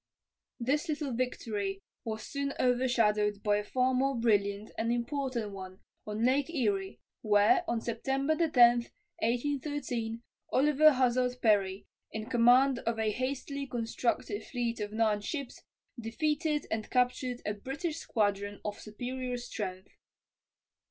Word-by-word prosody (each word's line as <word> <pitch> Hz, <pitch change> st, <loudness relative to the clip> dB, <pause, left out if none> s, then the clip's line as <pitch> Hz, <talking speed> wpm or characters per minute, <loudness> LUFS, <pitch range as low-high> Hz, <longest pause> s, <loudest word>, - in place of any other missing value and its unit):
This 290 Hz, +7 st, 0 dB
little 295 Hz, -4 st, -2 dB
victory 210 Hz, -5 st, -2 dB, 0.2 s
was 220 Hz, -1 st, -4 dB
soon 280 Hz, 0 st, -3 dB
overshadowed 225 Hz, -5 st, +2 dB
by 205 Hz, -1 st, +3 dB
a 210 Hz, -, -2 dB
far 255 Hz, +4 st, +1 dB
more 270 Hz, +2 st, +2 dB
brilliant 205 Hz, -3 st, +1 dB
and 230 Hz, +1 st, 0 dB
important 240 Hz, -2 st, -2 dB
one 190 Hz, -1 st, -9 dB, 0.3 s
on 215 Hz, +2 st, -1 dB
Lake 265 Hz, +3 st, +2 dB
Erie, 205 Hz, -, -1 dB, 0.2 s
where, 205 Hz, -1 st, +4 dB
on 235 Hz, -1 st, 0 dB
September 270 Hz, +6 st, 0 dB
10, 335 Hz, +1 st, +2 dB, 0.7 s
1813, 245 Hz, -2 st, -2 dB, 0.3 s
Oliver 300 Hz, +2 st, +5 dB
Hazard 250 Hz, -1 st, +2 dB
Perry, 200 Hz, -4 st, +2 dB, 0.3 s
in 220 Hz, 0 st, -4 dB
command 245 Hz, +2 st, +5 dB
of 230 Hz, 0 st, -2 dB
a 220 Hz, -1 st, +1 dB
hastily 275 Hz, +3 st, -3 dB
constructed 230 Hz, -3 st, -2 dB
fleet 240 Hz, -2 st, -3 dB
of 205 Hz, 0 st, -3 dB
nine 215 Hz, -1 st, +1 dB
ships, 275 Hz, +3 st, -5 dB, 0.4 s
defeated 300 Hz, +6 st, -1 dB
and 220 Hz, -1 st, -2 dB
captured 250 Hz, 0 st, 0 dB
a 210 Hz, -, 0 dB
British 275 Hz, -, -4 dB
squadron 205 Hz, -6 st, -1 dB
of 205 Hz, -1 st, -4 dB
superior 250 Hz, +3 st, -4 dB
strength. 200 Hz, -6 st, -6 dB
240 Hz, 125 wpm, -31 LUFS, 210-265 Hz, 0.7 s, Oliver